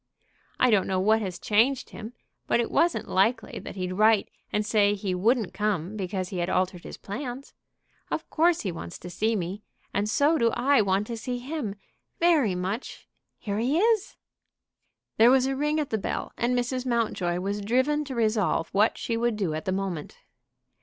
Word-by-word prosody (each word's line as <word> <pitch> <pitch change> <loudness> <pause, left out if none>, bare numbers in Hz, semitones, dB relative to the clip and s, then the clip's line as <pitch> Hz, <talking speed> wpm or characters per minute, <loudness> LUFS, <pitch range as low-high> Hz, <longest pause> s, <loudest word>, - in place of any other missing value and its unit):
I 255 - +4
don't 200 -3 +3
know 190 -1 0
what 220 +4 +3
has 185 -4 -4
changed 235 +8 +1
him; 225 +2 -8 0.3
but - - +2
it 235 - -1
wasn't 340 +1 +2
likely 225 +5 +1
that - - -9
he'd 185 -1 -3
write 215 +1 +3 0.2
and 210 0 0
say 205 -1 +3
he 195 -2 -3
wouldn't 220 +3 +1
come 205 -2 -1
because 185 -2 -3
he 185 - -4
had 175 +1 -1
altered 180 -1 0
his - - -8
plans. 245 +5 -6 0.6
Of - - -3
course 335 +1 +3
he 190 - -2
wants 85 - -7
to 180 - -9
see 220 +5 0
me; 190 +2 -3 0.3
and 205 +1 0
so 290 +8 +3
do 235 -1 +4
I 265 +1 +3
want 195 0 +1
to 230 +1 -5
see 245 +2 -3
him 250 -5 -4 0.4
very 310 - +3
much. 190 +7 -4 0.3
Here 205 0 -3
he 260 +7 +1
is!" 440 +1 +2 1.0
There 230 +2 +7
was 260 0 +4
a 270 0 -1
ring 300 +3 0
at 295 - -3
the 220 - 0
bell, - - -3
and 245 +1 0
Mrs. 250 +1 -1
Mountjoy 220 -8 0
was 200 +2 -2
driven 260 +8 +1
to 270 -2 -6
resolve 215 -7 +1
what 210 +3 +2
she 230 - -2
would 235 0 0
do 190 -7 -1
at 155 - -4
the 185 - 0
moment. 185 -5 -4
215 Hz, 190 wpm, -26 LUFS, 190-250 Hz, 1.0 s, There